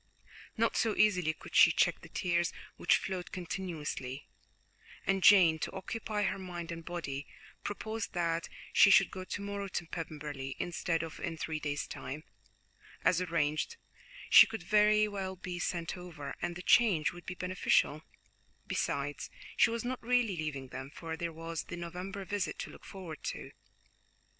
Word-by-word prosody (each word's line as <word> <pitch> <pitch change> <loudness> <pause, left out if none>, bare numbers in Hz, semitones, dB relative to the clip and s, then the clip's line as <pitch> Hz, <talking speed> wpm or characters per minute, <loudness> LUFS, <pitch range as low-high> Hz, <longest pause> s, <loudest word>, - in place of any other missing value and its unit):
Not 230 +1 +2
so 225 -3 +2
easily 180 -7 +4
could - - -13
she - - +9
check - - +2
the - - -12
tears 175 -2 +1 0.2
which 175 - +4
flowed 185 -2 -4
continuously, 160 -7 -4 0.8
and 195 0 +2
Jane, 175 -4 +7
to - - -3
occupy 210 +2 -3
her 195 - 0
mind 175 -2 -6
and 165 0 -6
body, 150 -5 -4 0.4
proposed 220 +2 -4
that 170 -1 0 0.2
she - - +8
should - - +6
go 185 -2 -6
to 200 - -4
morrow 200 0 -3
to 175 -2 -3
Pemberley, 150 -5 -5
instead 170 -1 -1
of 165 -1 -7
in 165 - -3
three 160 -1 -3
days' 145 -1 -2
time, 150 +4 -6 0.8
as 180 0 +4
arranged; 165 - 0 0.5
she - - +10
could 225 -4 -6
very 210 +2 +5
well 195 -2 -4
be 180 -1 -5
sent 170 -1 -2
over, 175 -5 -7
and 175 0 -2
the 175 - -7
change 190 -12 +4
would 175 0 -12
be 185 - -4
beneficial; 180 -4 +2 0.6
besides, 145 +1 -2 0.3
she 230 - +5
was 230 0 -3
not 255 0 -3
really 240 -4 +2
leaving 150 -5 -4
them, 130 +1 -6
for 160 +2 -6
there 170 0 -3
was 165 0 -5
the 175 - -6
November 180 +3 -5
visit 205 0 -2
to - - -5
look - - -14
forward 180 -5 -8
to. - - -5
175 Hz, 160 wpm, -32 LUFS, 160-195 Hz, 0.8 s, she